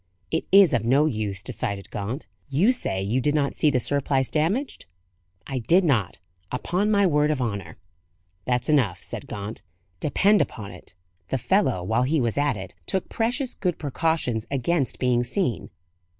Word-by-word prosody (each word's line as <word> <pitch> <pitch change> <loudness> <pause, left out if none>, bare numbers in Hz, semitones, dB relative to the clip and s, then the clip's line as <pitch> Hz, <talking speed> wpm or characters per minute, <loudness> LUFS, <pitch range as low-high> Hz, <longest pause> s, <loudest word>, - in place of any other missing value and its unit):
"It 160 - 0
is 195 -5 +7
of 120 -3 +1
no 135 +6 +4
use," 105 -8 -2
decided 100 -5 -4
Gaunt. 110 +8 -4 0.2
"You 165 - +4
say 95 - -2
you 115 +7 0
did 145 +4 +1
not 140 -2 +1
see 155 - +3
the 130 -3 +2
surplice 135 0 0
damaged?" 185 - -1 0.6
"I 135 -1 -3
did 175 +11 +3
not; 120 - +1 0.3
upon 180 +11 0
my 200 -2 +4
word 150 -3 +3
of 150 -3 0
honour." 100 -9 -4 0.7
"That's 125 -1 0
enough," 130 - +2
said - - -7
Gaunt. 105 +2 -6 0.4
"Depend 200 +7 +3
upon 105 -4 -4
it, 90 -1 -13 0.3
the 135 - -1
fellow, 130 - +1
while 110 +6 +1
he 145 +5 +2
was 120 -4 0
at 145 -6 +1
it, 95 -2 -8
took 190 - 0
precious 245 +3 -1
good 180 -4 -2
precautions 145 -6 -1
against 140 0 0
being 125 -1 +2
seen. 125 - -1
135 Hz, 165 wpm, -25 LUFS, 110-165 Hz, 0.7 s, is